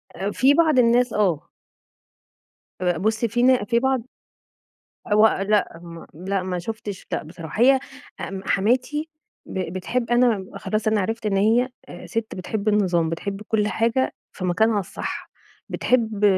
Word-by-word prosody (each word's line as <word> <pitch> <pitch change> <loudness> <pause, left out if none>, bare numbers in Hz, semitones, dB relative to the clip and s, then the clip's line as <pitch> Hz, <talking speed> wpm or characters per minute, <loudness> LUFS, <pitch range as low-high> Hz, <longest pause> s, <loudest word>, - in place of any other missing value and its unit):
آآ 200 +2 -2
في 270 +6 +4
بعض 310 -4 +4
الناس 240 0 +4
آه. 185 -8 0 1.3
آآ 175 -1 +1
بُص، 220 +3 0
في 240 +2 0
نا 255 -4 +4
في 235 +2 +1
بعض 265 -1 +1 1.1
هو 215 +1 +7 0.2
لأ، 210 -5 +1
هم 170 -1 -10
لأ 185 +4 -2
ما 185 -1 -3
شُفتِش 210 +1 -6
لأ - - -1
بصراحة. 165 +5 -7
هي 265 +1 +6 0.4
ام 195 0 -5
حماتي 255 +9 +1 0.4
ب 185 -3 -4
بتحب 230 +6 -2
أنا 240 -5 +3
خلاص 215 0 -2
أنا 215 -1 +2
عرفت 225 +3 -3
إن 195 - +1
هي 225 +6 +3 0.2
آآ - - -9
سِت 225 -1 -3
بتحب 200 +3 -3
النظام. 180 -6 +2
بتحب 195 +5 -4
كل 210 -1 +1
حاجة 230 +4 0 0.2
في 185 - -7
مكانها 205 +4 +2
الصح. 180 - -6 0.4
بتحب 225 -4 0
215 Hz, 150 wpm, -23 LUFS, 190-240 Hz, 1.3 s, هو